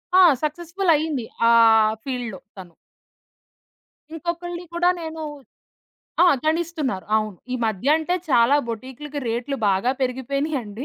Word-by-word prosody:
ఆ! - - +8 0.2
సక్సెస్‌ఫుల్ 345 +4 -1
అయ్యింది. 295 -5 -2 0.2
ఆ - - +6 0.5
ఫీల్డ్‌లో 245 -7 -4 0.2
తను. 180 -3 -11 1.4
ఇంకొకళ్ళని 345 +1 -5
కూడా 350 +1 +3
నేను 320 0 -6 1.0
ఆ! - - +6 0.2
గడిస్తున్నారు 315 - -1
అవును. 215 -3 -2 0.2
ఈ - - 0
మధ్య 220 +4 -2
అంటే 320 +3 -1 0.2
చాలా 245 +2 +5
బొటీక్లకి 265 +6 -6
రేట్లు 245 +5 -2
బాగా 195 +5 +2
పెరిగిపోయినయండి. 260 -2 -2
275 Hz, 110 wpm, -23 LUFS, 235-320 Hz, 1.4 s, ఆ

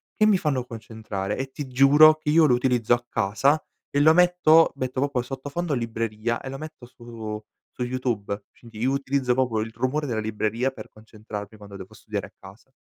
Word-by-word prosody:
che 215 - +3
mi 210 -3 +5
fanno 140 -7 -1
concentrare 110 -4 -5
e 135 0 -4
ti 140 +1 -6
giuro 140 +4 +6
che 155 -1 -5
io 160 +1 +5
lo 135 - +4
utilizzo 120 -2 +1
a 120 0 0
casa 115 +9 +1 0.3
e 145 - 0
lo 155 +2 +6
metto 175 -2 +5
metto 130 -1 -3
proprio 140 -2 0
il 120 - -3
sottofondo 145 +5 -4
libreria 115 -1 -2
e - - -9
lo 135 - -6
metto 155 -4 -10
su 115 -3 -8 0.3
su 125 - -4
YouTube, 115 -5 -3
quindi 115 -3 -13
io 125 +4 +1
utilizzo 135 -2 0
proprio 125 -3 0
il 110 +1 -5
rumore 145 +6 -1
della 120 -5 -2
libreria 110 +4 -1
per - - -11
concentrarmi, 110 -1 -10
quando 100 -1 -11
devo 95 -1 -11
studiare - - -5
a - - -25
casa. - - -16
125 Hz, 195 wpm, -24 LUFS, 110-140 Hz, 0.3 s, giuro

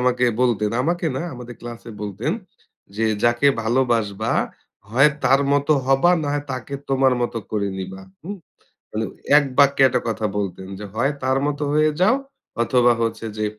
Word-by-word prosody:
আমাকে 125 0 +2 0.2
বলতেন, 105 -4 +2
আমাকে 170 +3 0
না 135 - -2
আমাদের 120 -1 -9
ক্লাসে 120 -1 -8
বলতেন, 100 -2 -2 0.6
যে 115 - +1 0.2
যাকে 120 +4 +3 0.2
ভালোবাসবা, 115 -4 0 0.6
হয় 135 +7 +5
তার 135 +2 +5
মত 145 +1 +1 0.2
হবা 135 +6 +4
না - - -2
হয় 145 0 -2
তাকে 130 +2 -5 0.2
তোমার 135 -1 +3
মত 120 - -2 0.2
করে 100 -2 0
নিবা 95 0 -6 0.2
হুম? 200 +4 -6 0.5
মানে 110 +1 -2 0.3
১ 150 - +5
বাক্যে 140 -1 +5
একটা - - 0
কথা 110 -1 -1
বলতেন 95 -2 -3
যে 105 - -7
হয় 130 +6 +1
তার 130 +1 +2
মত 145 -1 -2
হয়ে 155 0 +3
যাও, 215 +8 +5 0.5
অথবা 120 0 +4
হচ্ছে 115 0 -2
যে 110 - -1
125 Hz, 165 wpm, -22 LUFS, 110-140 Hz, 0.6 s, হয়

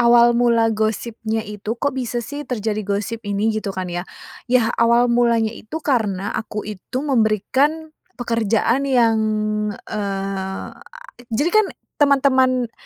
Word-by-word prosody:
awal 240 0 +6
mula 235 -1 +3
gosipnya 220 +1 -2
itu 210 +2 -5
kok 285 +4 -1
bisa 245 -2 -3
sih 290 +4 -6
terjadi 215 -3 -2
gosip 205 +3 -2
ini 205 +2 +1
gitu 215 -3 -3
kan 185 -1 -4
ya, 175 +1 -4 0.4
ya 240 -2 +3
awal 235 +1 +4
mulanya 235 -2 +3
itu 230 +8 -8
karena 205 -9 0
aku 215 -1 -5
itu 215 +6 -5
memberikan 270 +6 +1 0.2
pekerjaan 230 +2 +1
yang 235 -4 +3 0.7
eee, 195 -2 -4 0.6
jadi 285 +9 0
kan 430 -1 +5 0.3
teman-teman 260 -4 +3
230 Hz, 125 wpm, -21 LUFS, 215-255 Hz, 0.7 s, awal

